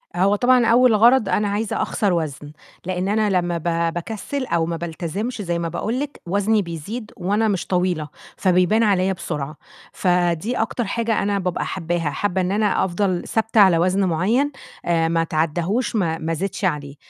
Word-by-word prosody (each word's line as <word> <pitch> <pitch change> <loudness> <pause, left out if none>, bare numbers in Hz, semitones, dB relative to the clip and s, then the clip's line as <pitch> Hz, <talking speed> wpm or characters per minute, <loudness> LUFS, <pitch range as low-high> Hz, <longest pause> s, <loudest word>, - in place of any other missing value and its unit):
هو 195 +3 +3
طبعًا 245 +1 +4
أول 240 -1 +5
غرض 230 -1 +5
أنا 210 0 +1
عايزة 205 +1 -1
أخسر 200 -4 0
وزن، 150 -3 -3 0.3
لإن 185 0 -2
أنا 215 0 +2
لمّا 175 -2 0
ب 165 0 -1
باكسّل 225 - -4
أو 165 -6 0
ما 165 0 -3
بالتزمش 175 +8 -4
زي 170 -2 -2
ما 170 - -2
باقول 225 +9 -2
لِك 290 0 -5
وزني 205 +3 +2
بيزيد 200 +7 -6
وأنا 205 +4 +1
مش 195 -4 -1
طويلة، 180 -4 0 0.3
فبيبان 185 +4 +3
عليَّ 190 -2 +2
بسرعة، 150 -3 -5 0.4
فدي 180 +5 +1
أكتر 225 +1 -1
حاجة 225 +1 -1
أنا 200 0 0
بابقى 180 -2 -2
حباها، 170 -3 -2
حابة 190 +4 -1
إن 180 +1 -1
أنا 210 -2 +1
أفضل 185 0 -1
ثابتة 225 0 +1
على 185 -4 +6
وزن 185 +3 +2
معيّن، 215 - +1 0.3
آآ 165 -1 +2
ما 165 0 +1
أتعداهوش 165 +9 -1
ما 165 -5 0
ما 165 +1 -3
أزيدش 195 +4 -2
عليه، 145 -4 -2
185 Hz, 170 wpm, -21 LUFS, 170-215 Hz, 0.4 s, على